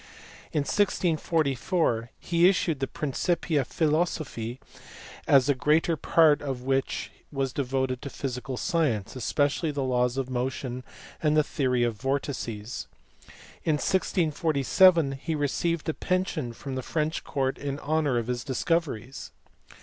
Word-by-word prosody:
In 150 - +1
1644 160 - +1
he 170 +1 +4
issued 170 -6 0
the 135 - -1
Principia 160 0 0
Philosophiae, 150 -6 -1 0.7
the 140 0 +5
greater 155 +5 +2
part 155 0 +4
of 135 -3 -4
which 135 0 -1 0.2
was 135 -3 -1
devoted 130 -2 -1
to 140 - -5
physical 130 -1 -4
science, 130 - 0
especially 145 +6 0
the 145 -2 -2
laws 125 -1 +1
of 135 -2 -1
motion 130 0 -3 0.4
and 155 -1 +3
the 155 - +5
theory 130 -5 0
of 115 -3 -1
vortices. 125 -5 -3 0.8
In 155 - +2
1647 165 -1 +3
he 145 +4 -3
received 155 +3 -1
a 160 - +1
pension 180 -9 -1
from 135 +3 -7
the 130 - -2
French 155 +4 -2
court 135 -2 -1
in 140 -1 -3
honour 150 -3 0
of 115 - -1
his 120 0 -2
discoveries. 135 -3 -2
140 Hz, 125 wpm, -27 LUFS, 130-160 Hz, 0.8 s, the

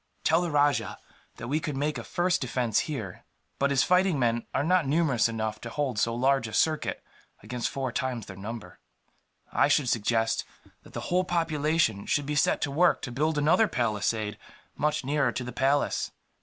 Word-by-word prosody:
"Tell 165 +2 +3
the 175 - -1
rajah 145 -1 +1 0.4
that - - -7
we 150 +5 0
could 150 -3 -4
make 150 +2 -1
a - - -6
first 180 +1 0
defence, 125 -4 0
here, 110 -12 -5 0.4
but 140 - +2
his 135 -2 +3
fighting 180 +2 +3
men 120 -2 0
are 135 - 0
not 175 -1 +2
numerous 140 -6 +2
enough 110 -1 -3
to 120 - -6
hold 130 -4 -2
so 115 +2 +1
large 135 0 +2
a 110 - -9
circuit 155 +7 0 0.4
against 120 +2 -3
four 135 -2 -3
times 125 -3 -2
their 95 - -9
number. 110 +4 -8 0.7
I - - +3
should 135 -5 +2
suggest 115 0 +1 0.4
that - - -17
the - - -4
whole 180 +1 +3
population 155 - 0
should 145 - +1
be 150 - -2
set 145 - +2
to 140 - -1
work 170 +5 +3
to 125 - -4
build 150 +5 0
another 155 +9 +4
palisade, 110 - -1 0.4
much 150 -1 0
nearer 140 -2 +1
to 125 - -3
the 125 - -6
palace. 135 +4 +1
135 Hz, 185 wpm, -27 LUFS, 115-155 Hz, 0.7 s, another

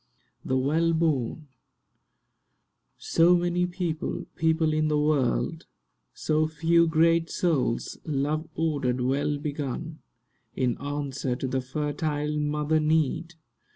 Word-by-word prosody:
THE 130 - 0
WELL 160 +6 +2
BORN 155 -2 0 1.5
SO 170 +2 +4
many 175 0 0
people—people—in 160 -2 -1
the 150 -1 +1
world; 150 +2 0 0.4
So 155 0 0
few 165 +2 +3
great 165 +1 +3
souls, 145 -9 -1
love 155 +2 -1
ordered, 145 -6 0
well 140 +3 0
begun, 150 +1 -4 0.6
In 125 -2 +1
answer 140 -3 -3
to 130 - -3
the 130 +1 -1
fertile 150 +2 -2
mother 150 +1 +1
need! 160 +2 0
155 Hz, 100 wpm, -26 LUFS, 140-165 Hz, 1.5 s, SO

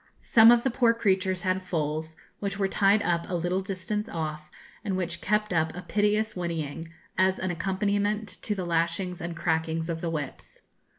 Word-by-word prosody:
Some 225 0 +7
of 240 0 +6
the 265 - +1
poor 235 -1 +3
creatures 190 -4 +1
had 185 0 +1
foals, 160 -2 -2 0.2
which 200 -1 -3
were 195 -1 +1
tied 200 +2 +3
up 170 -1 0
a 180 - -1
little 175 +2 0
distance 205 +3 -3
off, 155 -2 -4 0.3
and 195 -3 -1
which 175 -2 -3
kept 210 -1 +1
up 160 -1 +1
a 180 - -6
piteous 210 +3 +1
whinnying, 165 -3 -3 0.3
as 190 0 +3
an 185 -1 -2
accompaniment 200 +4 0
to 210 - -1
the 185 -2 -3
lashings 170 +2 -1
and 170 0 -5
crackings 160 -1 -1
of 165 -1 -4
the 170 - -1
whips. 150 -4 -6
185 Hz, 180 wpm, -27 LUFS, 165-205 Hz, 0.3 s, Some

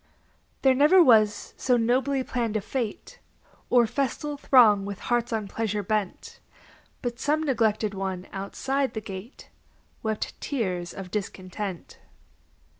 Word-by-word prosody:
There 265 -1 +6
never 300 +7 +6
was 215 -6 +3
so 250 -2 +2
nobly 260 +4 +1
planned 230 -4 -1
a - - 0
fête, 225 +1 -5 0.5
Or 245 -1 +5
festal 280 +4 -2
throng 235 -8 +5
with 200 -1 -5
hearts 240 +2 -1
on 220 -3 -2
pleasure 210 0 -2
bent, 210 -1 -3 0.6
But 240 -1 -3
some 305 +3 +1
neglected 220 -6 +1
one 190 -1 -4
outside 265 +8 -2
the - - -1
gate 200 +4 -10 0.5
Wept 220 -1 -3
tears 185 - -2
of 190 -2 -8
discontent. 195 -2 -5
225 Hz, 125 wpm, -26 LUFS, 200-260 Hz, 0.6 s, There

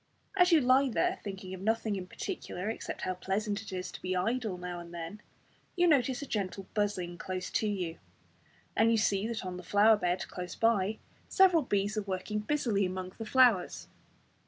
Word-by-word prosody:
As 360 -1 +5
you 325 -3 +6
lie 260 +2 +4
there 230 - 0
thinking 190 -2 -6
of 185 - -7
nothing 220 0 0
in 185 -2 -5
particular, 185 +2 -4
except - - -6
how 185 - 0
pleasant 200 +3 -2
it 220 - -9
is 185 -1 -4
to - - -10
be 185 0 -2
idle 220 +1 -1
now 180 0 -5
and 170 0 -10
then, 170 +5 -7 0.5
you 355 -1 +3
notice 270 -4 +3
a - - -5
gentle 195 -5 -3
buzzing 185 -5 -1
close 185 0 -4
to 215 - +1
you, 180 -5 -3 0.8
and 225 +1 +4
you 230 - +4
see 205 0 +1
that 230 -4 -4
on 180 -1 -4
the - - -7
flower 210 +4 +5
bed 180 -2 -1
close 180 -1 -6
by, 220 -2 +2 0.3
several 370 -4 +5
bees 205 -4 0
are - - +2
working 195 +2 -3
busily 220 -4 0
among 185 0 -3
the 225 - -4
flowers. 245 -8 +3
205 Hz, 190 wpm, -31 LUFS, 185-230 Hz, 0.8 s, you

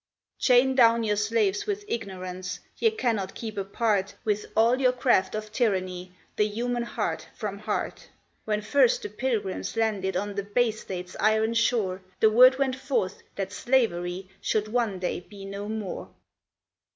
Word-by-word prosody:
Chain 255 +1 +5
down 235 -2 +5
your 210 -1 +1
slaves 210 - +1
with 410 0 -2
ignorance, 185 - -5 0.2
ye 455 - +4
cannot 230 - -1
keep 220 -2 -6
apart, 200 0 0
With 210 -1 0
all 235 +4 +4
your 255 -1 +4
craft 240 -6 +2
of 215 0 -5
tyranny, 185 -6 -1 0.3
the 210 - +3
human 240 +3 -2
heart 235 - -3
from 200 -3 -4
heart: 215 - -3 0.3
When 210 -1 -1
first 465 - +3
the 420 - -4
Pilgrims 225 - -2
landed 200 -4 0
on 205 +2 -2
the 200 - -2
Bay 225 +3 +2
State's 180 -4 -7
iron 220 +1 +3
shore, 225 -5 +1 0.2
The 220 - +5
word 255 +3 +7
went 270 -2 +1
forth 260 -8 -1
that 195 -1 -3
slavery 190 -7 0
should 215 0 0
one 225 -4 0
day 180 -1 -2
be 195 +2 -12
no 200 +1 -6
more. 215 -4 -4
215 Hz, 155 wpm, -27 LUFS, 195-240 Hz, 0.3 s, word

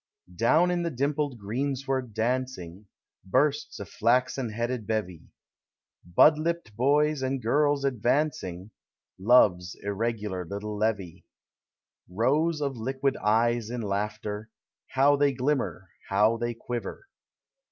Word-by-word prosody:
Down 155 - +3
the 170 - -1
dimpled 140 -1 -1
greensward 130 +2 -3
dancing, 110 -6 -3 0.4
Bursts 145 +8 0
a 100 - -5
fiaxen 125 +3 +1
headed 120 0 -3
bevy, 100 -7 -3 0.4
— 85 - -26
Bud 150 - +7
lipt 165 -9 -3
boys 145 +4 +2
and 130 +1 -1
girls 140 +4 +1
advancing, 120 - -1 0.5
Love's 95 -5 +4
irregular 105 -2 -2
little 100 +4 -5
levy. 105 -5 -2 0.8
Rows 150 - +1
of 135 -3 -2
liquid 135 +4 -1
eyes 115 +1 +1
in 120 0 -4
laughter, 105 +1 -3 0.4
How 140 +2 +3
they 140 -1 +3
glimmer, 120 - -2 0.2
how 105 +3 +3
they 120 0 -3
quiver! 120 - -6
120 Hz, 110 wpm, -27 LUFS, 105-140 Hz, 0.8 s, Bud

